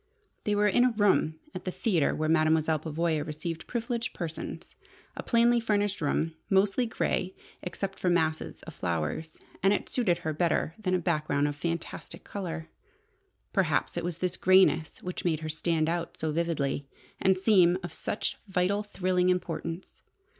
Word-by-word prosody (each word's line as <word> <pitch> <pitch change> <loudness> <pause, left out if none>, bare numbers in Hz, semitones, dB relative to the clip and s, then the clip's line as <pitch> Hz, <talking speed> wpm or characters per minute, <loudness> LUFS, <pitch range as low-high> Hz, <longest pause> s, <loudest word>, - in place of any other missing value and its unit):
They 210 - +2
were 210 0 +3
in 240 +4 +4
a 250 - +5
room 205 -7 +3 0.2
at - - -6
the - - -2
theatre 180 -5 +1
where 155 - -1
Mademoiselle 155 0 +3
Pavoya 160 0 -1
received 160 +2 -5
privileged 235 0 -2
persons: 165 -3 -6 0.4
a - - -4
plainly 235 0 +4
furnished 205 -4 0
room, 160 +2 0 0.2
mostly 195 +5 +3
grey 190 -4 -1 0.3
except 195 +2 -4
for 180 - +1
masses 160 -2 0
of 165 - -9
flowers, 85 - -3 0.2
and 195 +2 +4
it - - -2
suited 200 -9 +2
her 160 -2 -3
better 165 0 +1
than 185 -4 +1
a - - +4
background 155 -4 +1
of 145 - -3
fantastic 170 +2 -5
colour. 170 -5 -5 0.9
Perhaps 155 -9 +1
it - - -2
was 175 -1 -3
this 180 -1 -2
greyness 185 -4 +4
which 180 0 -4
made 160 -3 0
her 155 - -4
stand 160 0 0
out 170 0 -2
so 160 -1 -1
vividly, 150 -4 -1 0.3
and 190 0 +4
seem 185 -3 +5
of 175 -2 -6
such 205 - -3
vital, 190 +2 +1
thrilling 185 -3 +1
importance. 170 -1 -3
175 Hz, 160 wpm, -29 LUFS, 160-195 Hz, 0.9 s, a